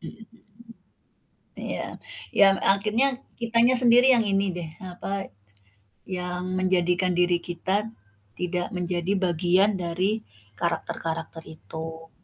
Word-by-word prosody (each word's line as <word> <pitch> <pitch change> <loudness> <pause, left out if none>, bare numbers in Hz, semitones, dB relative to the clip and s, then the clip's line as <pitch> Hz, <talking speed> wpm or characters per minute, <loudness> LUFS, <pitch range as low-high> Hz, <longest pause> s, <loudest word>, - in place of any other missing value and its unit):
Mhm - - -8
mhm. 225 -1 -12 1.3
Ya, - - -5 0.3
yang 195 -1 +5
akhirnya 210 +7 +3 0.3
kitanya 235 +2 +4
sendiri 245 +2 +6
yang 235 - +4
ini 200 -1 +1
deh, 170 -3 -5
apa, 195 0 -5 0.8
yang 180 -1 -3 0.2
menjadikan 180 -1 +1
diri 175 0 +3
kita 185 +5 -2 0.5
tidak 180 +4 -2
menjadi 180 +1 -1
bagian 185 +2 +2
dari 180 +3 -1 0.5
karakter-karakter 165 -1 -3
itu. 160 +1 -9
180 Hz, 105 wpm, -25 LUFS, 175-200 Hz, 1.3 s, sendiri